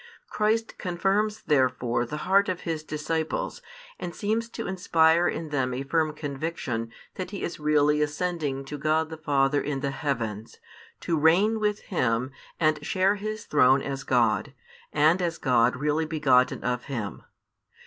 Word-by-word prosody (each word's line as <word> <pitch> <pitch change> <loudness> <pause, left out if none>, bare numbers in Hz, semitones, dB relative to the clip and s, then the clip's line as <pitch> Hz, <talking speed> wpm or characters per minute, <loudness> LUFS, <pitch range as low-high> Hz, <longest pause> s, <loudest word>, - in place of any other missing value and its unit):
Christ 220 +1 0
confirms 195 +4 0
therefore 125 -4 +1
the 150 - -5
heart 200 +2 +4
of 185 - -3
His 165 -2 -3
disciples, 155 - -3 0.4
and 175 - -5
seems 225 +3 -1
to 230 - -6
inspire 170 -2 +3
in 160 - -3
them 130 -3 -1
a 135 - -3
firm 155 +2 0
conviction 140 -6 -4 0.3
that 185 -1 -4
He 200 0 -6
is 170 - -4
really 150 0 +3
ascending 150 -3 -2
to 145 +2 -6
God 155 +2 +1
the 160 - -6
Father 145 -2 +1
in 140 -2 -3
the 140 -1 -1
heavens, 115 -7 -3 0.4
to 165 -3 0
reign 190 +8 +4
with 210 -1 0
Him 125 - -1 0.3
and 155 -2 +2
share 190 +5 +2
His 215 +1 -5
throne 135 -1 +4
as 135 -1 -4
God, 115 -7 +1 0.4
and 155 +5 +3
as 170 -2 -1
God 125 -2 +3
really 150 +4 0
begotten 135 -5 +2
of 125 0 -2
Him. 115 -8 -5
155 Hz, 155 wpm, -26 LUFS, 135-175 Hz, 0.4 s, heart